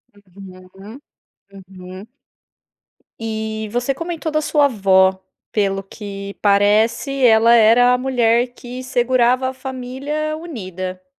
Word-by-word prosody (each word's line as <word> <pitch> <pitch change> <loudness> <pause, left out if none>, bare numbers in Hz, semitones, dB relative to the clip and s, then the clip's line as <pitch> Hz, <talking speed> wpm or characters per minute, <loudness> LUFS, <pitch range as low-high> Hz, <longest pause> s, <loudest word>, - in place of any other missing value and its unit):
Uhum, 195 +3 -14 0.7
uhum. 185 +1 -11 1.1
E 220 -1 -4
você 245 +3 -1
comentou 330 +1 -5
da 310 - 0
sua 295 -1 +2
avó, 190 -6 +3 0.3
pelo 195 -2 -1
que 200 0 -9
parece, 215 +7 +2
ela 230 0 +5
era 235 +2 +5
a - - +2
mulher 245 -2 +1
que 250 +1 -9
segurava 255 0 +1
a 260 - -7
família 265 +4 -5
unida. 185 - -7
230 Hz, 105 wpm, -19 LUFS, 200-260 Hz, 1.1 s, ela